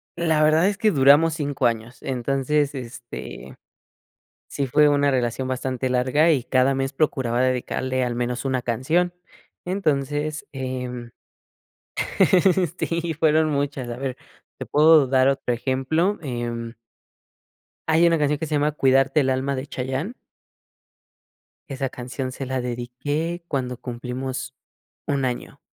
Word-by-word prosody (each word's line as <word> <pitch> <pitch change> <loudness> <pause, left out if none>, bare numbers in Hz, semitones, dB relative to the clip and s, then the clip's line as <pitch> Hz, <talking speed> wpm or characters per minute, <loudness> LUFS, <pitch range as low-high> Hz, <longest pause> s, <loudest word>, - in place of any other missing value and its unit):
La 160 -3 +1
verdad 155 +4 +4
es 205 0 -1
que 220 - +4
duramos 145 0 +5
5 145 -4 0
años 115 +1 -4
entonces, 135 +3 0
este, 120 - -8 0.9
sí 140 - -2
fue 150 +4 +4
una 145 0 +3
relación 130 0 -1
bastante 130 0 -2
larga 130 +6 +3
y 135 -7 +2
cada 130 +1 +2
mes 135 0 -2
procuraba 130 -5 +1
dedicarle 130 0 -1
al 120 -1 -2
menos 125 +1 -2
una 130 -2 0
canción. 155 +10 0 0.5
Entonces, 155 -4 -1
em, 125 -2 -5 1.7
sí 170 0 -1
fueron 155 0 +3
muchas. 140 -3 -2
A 120 - -4
ver, 130 -1 -3 0.4
te - - -5
puedo 155 -1 +6
dar 130 0 +3
otro 135 -2 0
ejemplo, 135 - 0
em 120 -3 -4 1.2
hay 160 +2 +5
una 170 -1 +4
canción 150 -1 +1
que 160 - -3
se 150 - -1
llama 150 +1 +1
Cuidarte 135 +1 +3
el 130 - +1
alma 130 +1 0
de 130 +1 -4
Chayanne. 135 - -4 1.6
Esa 135 -1 -3
canción 130 +1 -5
se 135 +1 -6
la 130 0 -2
dediqué 145 +8 -3
cuando 125 -3 -2
cumplimos 125 +1 -5 0.5
1, 140 -2 0
año. 125 -1 -4
135 Hz, 135 wpm, -23 LUFS, 125-150 Hz, 1.7 s, puedo